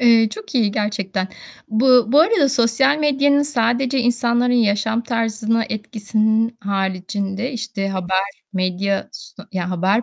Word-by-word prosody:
Eee, 230 -2 +5
çok 425 - -9
iyi 225 -5 +2
gerçekten. 200 -2 -2 0.4
Bu 245 +2 +4
bu 290 - +7
arada 340 -4 +3
sosyal 265 +2 +2
medyanın 285 -1 +2
sadece 260 -1 0
insanların 245 0 +1
yaşam 220 -1 +1
tarzına 225 -1 -1
etkisinin 220 +1 -1
haricinde, 195 +3 -3
işte, 220 -4 -4
haber, 190 +1 -2
medya 190 +1 -1
s 195 - -11
ya 180 -1 -3
haber 190 +5 +1
225 Hz, 125 wpm, -20 LUFS, 200-245 Hz, 0.4 s, bu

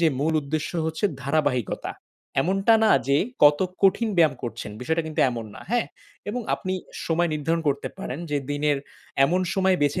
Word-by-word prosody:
যে 170 - +5
মূল 160 +2 +1
উদ্দেশ্য 150 +2 -2 0.2
হচ্ছে 160 +5 -3 0.2
ধারাবাহিকতা। 140 -5 0 0.5
এমনটা 195 +6 +3
না 215 - +5 0.2
যে 140 - +4 0.3
কত 145 +2 +6 0.2
কঠিন 200 +4 +4
ব্যায়াম 155 -4 +5
করছেন, 115 -3 -5
বিষয়টা 160 +6 0
কিন্তু 155 - -2
এমন 115 -2 -4
না। - - -10
হ্যাঁ? 240 -2 +1 0.4
এবং 250 - -3
আপনি 185 -1 -3 0.3
সময় 170 +1 +2
নির্ধারণ 165 +3 -1
করতে 140 -1 -1
পারেন 135 - -5
যে 145 - +1
দিনের 145 0 +1 0.5
এমন 180 +6 +2
সময় 190 -1 +3
বেছে 145 0 +1
155 Hz, 170 wpm, -25 LUFS, 140-185 Hz, 0.5 s, কত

